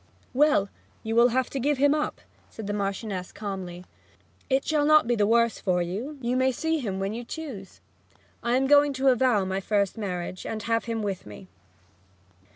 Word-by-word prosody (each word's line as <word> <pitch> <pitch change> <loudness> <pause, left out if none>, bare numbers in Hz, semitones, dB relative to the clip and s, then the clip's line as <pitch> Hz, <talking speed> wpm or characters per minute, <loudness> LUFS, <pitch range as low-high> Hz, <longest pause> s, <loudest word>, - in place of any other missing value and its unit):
'Well, 280 -7 +3 0.4
you 225 0 -2
will 235 +1 +7
have 255 +1 0
to 275 - -3
give 285 +2 +1
him 285 +2 +4
up,' 300 0 -2 0.3
said 220 - -8
the 205 - -2
Marchioness 195 -2 -3
calmly. 185 -4 -6 0.6
'It 265 0 +1
shall 305 -2 +1
not 305 +1 +5
be 240 - +1
the 205 -2 +2
worse 230 0 +3
for 180 -2 +1
you 225 - -5
you 245 0 -1
may 260 +1 +3
see 320 +5 -1
him 200 -7 -3
when 195 +2 -2
you 235 +2 -5
choose. 240 -9 -8 0.6
I 240 +1 +1
am 265 - +1
going 290 +1 +5
to 270 0 +2
avow 245 -5 +3
my 190 +1 -2
first 200 +1 0
marriage, 180 -3 -4
and 215 -1 -5
have 230 0 0
him 225 -2 -3
with 195 - -4
me.' 100 -3 -11
230 Hz, 190 wpm, -26 LUFS, 195-265 Hz, 0.6 s, will